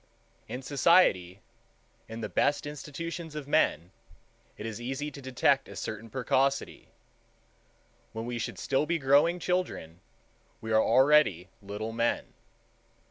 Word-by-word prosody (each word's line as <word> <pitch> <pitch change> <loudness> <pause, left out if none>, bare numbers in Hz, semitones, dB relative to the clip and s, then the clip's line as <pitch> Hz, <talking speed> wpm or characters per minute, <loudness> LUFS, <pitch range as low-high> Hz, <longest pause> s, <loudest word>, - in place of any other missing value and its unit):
In 130 +2 -6
society, 130 - +3 0.7
in 115 +1 -7
the 105 - -3
best 145 +7 +1
institutions 155 +2 -6
of 150 -2 -6
men, 120 - +1 0.7
it - - -7
is 115 +1 -5
easy 135 +4 -4
to 140 - -10
detect 130 +1 +1
a - - -10
certain 110 +1 -6
precocity. 135 +3 0 1.2
When 110 +1 -5
we 120 0 -4
should - - -4
still 140 +2 0
be 170 - +1
growing 145 +4 +3
children, 180 - -3 0.6
we 110 - -6
are 110 0 +5
already 130 - +4
little 105 +2 -5
men. 115 +1 -1
135 Hz, 130 wpm, -29 LUFS, 110-150 Hz, 1.2 s, are